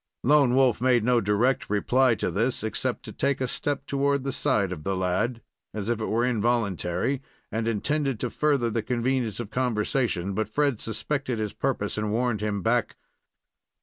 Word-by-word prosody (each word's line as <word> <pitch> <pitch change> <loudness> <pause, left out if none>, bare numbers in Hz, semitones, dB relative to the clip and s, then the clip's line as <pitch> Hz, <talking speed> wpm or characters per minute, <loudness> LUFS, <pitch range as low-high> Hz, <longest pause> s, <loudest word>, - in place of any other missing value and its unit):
Lone 140 -2 +4
Wolf 130 -4 +3
made 125 -3 +3
no 120 0 +3
direct 105 +6 +1
reply 120 +4 +3
to - - -2
this, 115 +4 0
except 110 - -2
to - - -7
take 140 0 0
a 130 - 0
step 140 +2 -2
toward 140 -1 0
the 135 - -2
side 100 -6 +1
of 80 -5 -6
the 95 +3 -1
lad, 105 +6 -1 0.3
as 105 0 -3
if 120 -2 0
it - - -1
were 115 +3 +1
involuntary, 115 - 0 0.3
and 110 +1 -1
intended 135 +3 0
to - - -2
further 140 -6 +1
the 115 - 0
convenience 120 -2 -1
of 115 -3 -5
conversation; 115 -5 0
but 110 +1 -1
Fred 140 -1 0
suspected 130 +3 -2
his 105 -2 -3
purpose, 115 -6 -2
and 105 -1 -1
warned 120 -1 0
him 105 -3 -2
back. 120 +1 +1
120 Hz, 180 wpm, -26 LUFS, 105-130 Hz, 0.3 s, Lone